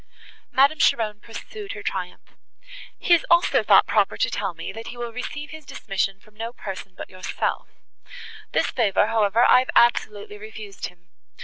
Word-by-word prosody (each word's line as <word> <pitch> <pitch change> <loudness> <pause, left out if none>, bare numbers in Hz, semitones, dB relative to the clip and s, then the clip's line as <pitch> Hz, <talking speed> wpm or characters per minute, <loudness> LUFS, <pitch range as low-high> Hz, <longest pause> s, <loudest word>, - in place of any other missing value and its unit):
Madame 280 +3 +4
Cheron 215 -3 +2
pursued 400 - -8
her 205 - -8
triumph. 180 -3 -5 0.6
"He 350 - +3
has 340 - +5
also 340 +1 +4
thought - - +6
proper - - +1
to - - +1
tell 195 -4 -3
me, 165 - -6
that 225 +1 -9
he 240 - -8
will 240 -1 -5
receive 290 +4 -6
his 315 -1 -10
dismission 195 -6 -3
from 215 +2 -23
no 225 +2 -6
person 195 -4 -8
but - - -7
yourself; 185 0 -3 0.8
this - - +1
favour, 205 -5 +2
however, 225 +1 +2
I 250 - +7
have 260 - -3
absolutely 210 -3 +2
refused 215 -2 -7
him. 180 +1 -20
220 Hz, 170 wpm, -23 LUFS, 195-250 Hz, 0.8 s, I